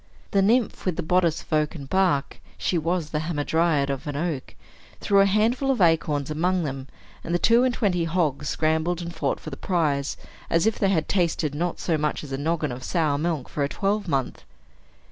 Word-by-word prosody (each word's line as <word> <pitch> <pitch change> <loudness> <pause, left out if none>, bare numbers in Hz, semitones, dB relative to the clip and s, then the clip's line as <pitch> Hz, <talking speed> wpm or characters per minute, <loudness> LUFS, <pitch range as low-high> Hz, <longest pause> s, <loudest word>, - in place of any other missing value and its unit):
The 195 - +3
nymph 225 +4 +2
with 180 - +1
the 175 - -3
bodice 170 -1 +1
of - - -8
oaken 150 -1 0
bark 180 -3 0 0.2
(she - - -1
was 165 -1 -1
the 150 - 0
hamadryad 155 -2 +1
of 135 +1 -5
an 145 - -3
oak) 150 -3 -3 0.4
threw 200 -1 +3
a 195 - +6
handful 225 +7 +2
of 265 -4 +1
acorns 155 -4 +2
among 180 +3 +1
them; 135 -2 -5 0.4
and 170 - -1
the - - +4
two 230 +6 +4
and 255 - +3
twenty 185 -8 0
hogs 155 -4 0
scrambled 160 +3 0
and 170 0 -6
fought 150 -4 -1
for 155 - -8
the 135 - -7
prize, 150 -6 0 0.3
as 165 +3 +2
if 220 - +1
they 195 - +2
had 160 -5 +1
tasted 170 -5 0
not 170 +3 -2
so 160 -3 0
much 150 0 -1
as 145 - -9
a 135 - -2
noggin 155 -1 -1
of 125 +1 -7
sour 155 -5 0
milk 160 -5 -1
for 145 - -2
a 140 - 0
twelvemonth. 195 -10 -1
165 Hz, 205 wpm, -25 LUFS, 150-185 Hz, 0.4 s, a